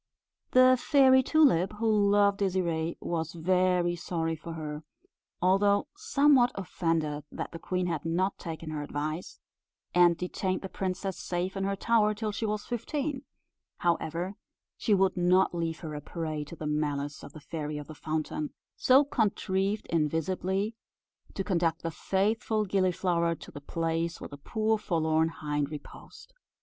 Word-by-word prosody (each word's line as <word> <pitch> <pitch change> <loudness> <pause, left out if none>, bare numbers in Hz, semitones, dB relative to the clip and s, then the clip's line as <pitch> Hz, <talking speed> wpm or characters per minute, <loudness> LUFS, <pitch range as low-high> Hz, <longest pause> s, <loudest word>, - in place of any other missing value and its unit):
The 255 0 +7
Fairy 265 -3 +6
Tulip, 260 - +3
who 210 -2 +2
loved 200 0 +4
Désirée, 170 -4 0
was 160 -2 -3
very 180 0 +2
sorry 165 -1 -2
for 165 +1 -8
her, 150 -2 -5 0.6
although 200 +2 +3
somewhat 290 - +4
offended 165 -5 -1
that - - -5
the 165 - -7
queen 180 +2 -1
had 165 -4 -2
not 180 +4 0
taken 160 -2 -6
her 150 -1 -3
advice, 150 +3 -4 0.5
and 175 -1 +5
detained 185 +1 -2
the 190 - -5
princess 190 0 -3
safe 180 +2 -2
in 195 0 -1
her 195 0 0
tower 215 0 +2
till 215 0 -2
she 220 +2 -2
was 210 0 -2
fifteen; 275 +4 -3 0.5
however, 170 +2 -1 0.4
she 210 - +2
would 190 -1 +2
not 180 +1 +3
leave 165 -1 -2
her 160 -3 -6
a 150 - -5
prey 155 -1 -4
to 160 - -10
the 155 - -7
malice 145 -1 -2
of 140 - -11
the 155 - -9
Fairy 150 0 -5
of 145 - -6
the 155 - -9
Fountain, 155 0 -3 0.2
so 265 +3 +5
contrived 200 -4 0
invisibly 180 +6 0 0.6
to 195 - -1
conduct 170 -4 0
the 165 - -2
faithful 210 +5 0
Gilliflower 180 -3 +1
to - - -12
the 145 - -9
place 165 +2 -2
where - - -7
the 145 - -9
poor 220 +8 0
forlorn 160 -4 +1
hind 150 -3 -2
reposed. 155 - -11
180 Hz, 155 wpm, -29 LUFS, 160-205 Hz, 0.6 s, The